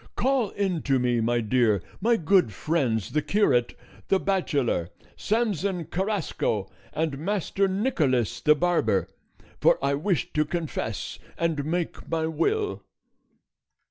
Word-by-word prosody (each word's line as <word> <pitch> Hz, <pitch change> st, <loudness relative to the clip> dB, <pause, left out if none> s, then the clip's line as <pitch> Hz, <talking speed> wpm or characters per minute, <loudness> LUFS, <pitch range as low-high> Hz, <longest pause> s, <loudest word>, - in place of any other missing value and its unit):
Call 260 Hz, -4 st, +1 dB
in 190 Hz, -5 st, -1 dB
to 135 Hz, -2 st, +2 dB
me, 125 Hz, -2 st, +1 dB
my 120 Hz, +1 st, +1 dB
dear, 110 Hz, -2 st, +2 dB, 0.2 s
my 230 Hz, +3 st, +3 dB
good 170 Hz, -, +3 dB
friends 120 Hz, -, -1 dB
the 150 Hz, -, +1 dB
curate, 145 Hz, -, +2 dB, 0.3 s
the 195 Hz, -, +3 dB
bachelor 140 Hz, -, 0 dB, 0.3 s
Samson 200 Hz, -6 st, -1 dB
Carrasco, 185 Hz, -, -1 dB, 0.2 s
and 155 Hz, -3 st, -2 dB
Master 195 Hz, +2 st, 0 dB
Nicholas 150 Hz, -, 0 dB
the 150 Hz, 0 st, +5 dB
barber, 150 Hz, -, +1 dB, 0.5 s
for -, -, +5 dB
I 140 Hz, 0 st, +1 dB
wish 155 Hz, -, -1 dB
to 150 Hz, -, +3 dB
confess 155 Hz, -, -4 dB, 0.2 s
and 165 Hz, -4 st, 0 dB
make 170 Hz, +2 st, -3 dB
my 160 Hz, -1 st, 0 dB
will." 405 Hz, -, 0 dB
160 Hz, 125 wpm, -26 LUFS, 125-195 Hz, 0.5 s, the